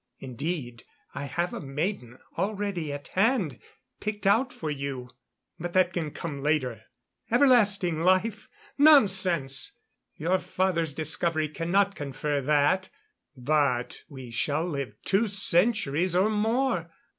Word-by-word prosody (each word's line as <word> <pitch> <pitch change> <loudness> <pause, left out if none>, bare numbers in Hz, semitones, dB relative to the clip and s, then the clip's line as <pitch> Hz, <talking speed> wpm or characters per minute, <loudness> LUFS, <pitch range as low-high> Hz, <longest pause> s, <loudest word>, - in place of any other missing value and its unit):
Indeed, 130 -2 -5 0.3
I 140 - -5
have 170 +4 -2
a - - -5
maiden 140 - -4 0.2
already 200 -6 -2
at 145 0 -7
hand, 195 - +1 0.4
picked 210 -1 -4
out 235 +6 +3
for 155 -2 -5
you.... 135 -3 -5 0.5
But 175 +1 -5
that 185 -1 +3
can 165 -4 -2
come 145 -2 -6
later.... 135 -7 0 0.5
Everlasting 205 - +4
life? 190 +4 +1 0.3
Nonsense! 190 - +4 0.4
Your 180 +4 0
father's 170 -7 -1
discovery 155 0 -1
cannot 190 +6 +1
confer 145 -1 -3
that. 150 +7 +2 0.5
But 130 -2 0
we 130 -5 -10
shall 145 +7 0
live 140 -10 -4
two 200 +4 +2
centuries 185 -4 +2
or 195 +4 +3
more. 220 -4 0
170 Hz, 120 wpm, -27 LUFS, 145-195 Hz, 0.5 s, Everlasting